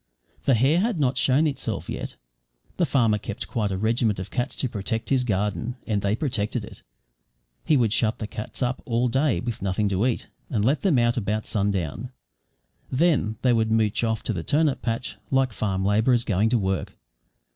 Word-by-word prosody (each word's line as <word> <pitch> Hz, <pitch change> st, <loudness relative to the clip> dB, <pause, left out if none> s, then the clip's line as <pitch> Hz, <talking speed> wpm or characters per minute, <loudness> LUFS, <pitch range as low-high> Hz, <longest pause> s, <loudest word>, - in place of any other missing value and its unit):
The 135 Hz, -, +5 dB
hare 135 Hz, +9 st, +3 dB
had 215 Hz, -3 st, 0 dB
not 135 Hz, -2 st, +2 dB
shown 140 Hz, +4 st, +3 dB
itself 145 Hz, -3 st, -2 dB
yet. -, -, -5 dB, 0.6 s
The 175 Hz, -, +2 dB
farmer 115 Hz, -6 st, +2 dB
kept 105 Hz, 0 st, -5 dB
quite 105 Hz, -3 st, -1 dB
a 95 Hz, -, -2 dB
regiment 110 Hz, +1 st, +1 dB
of 95 Hz, -, -6 dB
cats 125 Hz, +2 st, -2 dB
to 130 Hz, -, -1 dB
protect 110 Hz, +1 st, -3 dB
his 130 Hz, -2 st, +3 dB
garden 105 Hz, +2 st, -1 dB
and 105 Hz, -3 st, 0 dB
they 100 Hz, +2 st, +1 dB
protected 115 Hz, -4 st, -2 dB
it. -, -, -13 dB, 0.8 s
He 155 Hz, -, +3 dB
would 115 Hz, -4 st, +2 dB
shut 110 Hz, -1 st, +1 dB
the 110 Hz, -, -4 dB
cats 105 Hz, +4 st, -4 dB
up 125 Hz, +1 st, -1 dB
all 120 Hz, +1 st, +1 dB
day 135 Hz, -, +1 dB
with 120 Hz, 0 st, -4 dB
nothing 100 Hz, +2 st, 0 dB
to 100 Hz, +5 st, +1 dB
eat, 120 Hz, -, -2 dB, 0.2 s
and 105 Hz, -4 st, 0 dB
let 140 Hz, +6 st, +2 dB
them 180 Hz, -9 st, +3 dB
out 120 Hz, 0 st, +2 dB
about 110 Hz, -1 st, -1 dB
sundown; 100 Hz, -, -1 dB, 0.8 s
then 135 Hz, -7 st, +2 dB
they 125 Hz, -2 st, +4 dB
would 110 Hz, -1 st, +2 dB
mooch 110 Hz, 0 st, +1 dB
off 110 Hz, -1 st, 0 dB
to 115 Hz, -, -1 dB
the 85 Hz, -, -3 dB
turnip 150 Hz, -, +1 dB
patch 115 Hz, +1 st, -3 dB
like 135 Hz, -3 st, +2 dB
farm 95 Hz, -3 st, -1 dB
labourers 110 Hz, +4 st, +3 dB
going 105 Hz, +1 st, +1 dB
to 120 Hz, -, +3 dB
work. 95 Hz, -3 st, -2 dB
115 Hz, 190 wpm, -25 LUFS, 105-130 Hz, 0.8 s, The